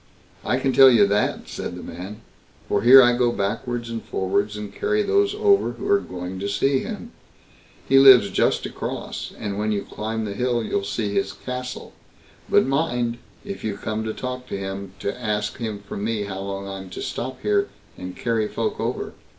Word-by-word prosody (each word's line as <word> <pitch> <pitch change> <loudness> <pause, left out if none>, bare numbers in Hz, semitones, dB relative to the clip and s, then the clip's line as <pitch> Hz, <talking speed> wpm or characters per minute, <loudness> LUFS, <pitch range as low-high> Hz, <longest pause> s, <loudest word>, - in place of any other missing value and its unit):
"I 125 - +1
can 130 0 0
tell 135 +1 +9
you 115 -5 +6
that", 100 +1 0
said - - -5
the - - -8
man; 95 +6 -8 0.5
"for 100 - +1
here 130 +4 +9
I 120 0 +4
go 120 -1 +2
backwards 115 +4 -2
and 115 -1 -4
forwards, 100 +2 -1
and 105 -1 -7
carry 425 0 0
those 405 0 +2
over 415 -2 +3
who - - -6
are 405 - +5
going 90 - -6
to 100 +1 -2
see 135 +6 +2
him. - - -6 0.8
He 135 0 +6
lives 130 -7 +8
just - - +1
across, - - -5
and 100 0 -4
when 110 +1 0
you 100 -1 -1
climb 110 +1 -4
the 100 - -4
hill 120 +1 0
you'll 100 - -1
see 105 -2 -2
his 130 - 0
castle; 125 0 -6 0.6
but - - +5
mind, 125 -4 0 0.3
if 200 -1 -6
you 105 -2 -2
come 110 +1 -3
to 110 - -2
talk 125 0 -5
with 100 - -3
him, 95 0 -5
to 100 +5 -4
ask 105 -1 -1
him 110 -3 -3
from 100 - -5
me 110 -1 -1
how 95 -1 -5
long 100 0 -5
I'm 95 -1 -7
to 90 - -7
stop 130 +1 -4
here 205 -1 +2 0.3
and 90 0 -8
carry 115 -2 0
folk - - -3
over." - - -3
110 Hz, 195 wpm, -23 LUFS, 100-130 Hz, 0.8 s, tell